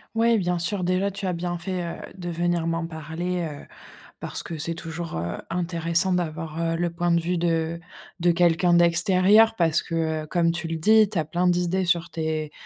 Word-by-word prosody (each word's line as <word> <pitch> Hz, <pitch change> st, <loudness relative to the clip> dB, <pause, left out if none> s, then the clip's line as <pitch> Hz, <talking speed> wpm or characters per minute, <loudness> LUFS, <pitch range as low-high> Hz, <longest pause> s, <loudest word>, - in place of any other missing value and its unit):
Ouais, 230 Hz, 0 st, +3 dB
bien 175 Hz, -2 st, 0 dB
sûr, 185 Hz, +2 st, -2 dB
déjà 185 Hz, +3 st, +1 dB
tu 200 Hz, +1 st, -6 dB
as 185 Hz, -, 0 dB
bien 175 Hz, 0 st, -3 dB
fait, 180 Hz, +1 st, -3 dB
heu, 170 Hz, -, -5 dB, 0.2 s
de 175 Hz, -1 st, -5 dB
venir 170 Hz, 0 st, 0 dB
m'en 165 Hz, 0 st, -1 dB
parler, 165 Hz, +2 st, -4 dB
heu, 145 Hz, -, -9 dB, 0.6 s
parce -, -, -5 dB
que 165 Hz, -, -5 dB
c'est 165 Hz, +2 st, -2 dB
toujours, 165 Hz, -, -6 dB
heu, 85 Hz, +2 st, -3 dB
intéressant 170 Hz, +1 st, 0 dB
d'avoir, 165 Hz, -2 st, -2 dB
heu, 165 Hz, 0 st, 0 dB
le 175 Hz, 0 st, -1 dB
point 175 Hz, +1 st, -1 dB
de 170 Hz, 0 st, +3 dB
vue 175 Hz, +1 st, -1 dB
de 165 Hz, 0 st, 0 dB, 0.4 s
de 175 Hz, 0 st, +4 dB
quelqu'un 175 Hz, 0 st, +3 dB
d'extérieur 185 Hz, +6 st, +4 dB
parce 165 Hz, -1 st, +2 dB
que, 165 Hz, -, -6 dB, 0.3 s
heu, 155 Hz, -, -9 dB
comme 170 Hz, -2 st, +2 dB
tu 170 Hz, -1 st, -4 dB
le 165 Hz, -, -2 dB
dis, 215 Hz, +5 st, +5 dB
tu 195 Hz, -, -2 dB
as 155 Hz, -, +1 dB
plein 175 Hz, +3 st, 0 dB
d'idées 180 Hz, +1 st, +1 dB
sur 170 Hz, -1 st, +1 dB
tes, 155 Hz, -1 st, -3 dB
170 Hz, 205 wpm, -24 LUFS, 165-180 Hz, 0.6 s, dis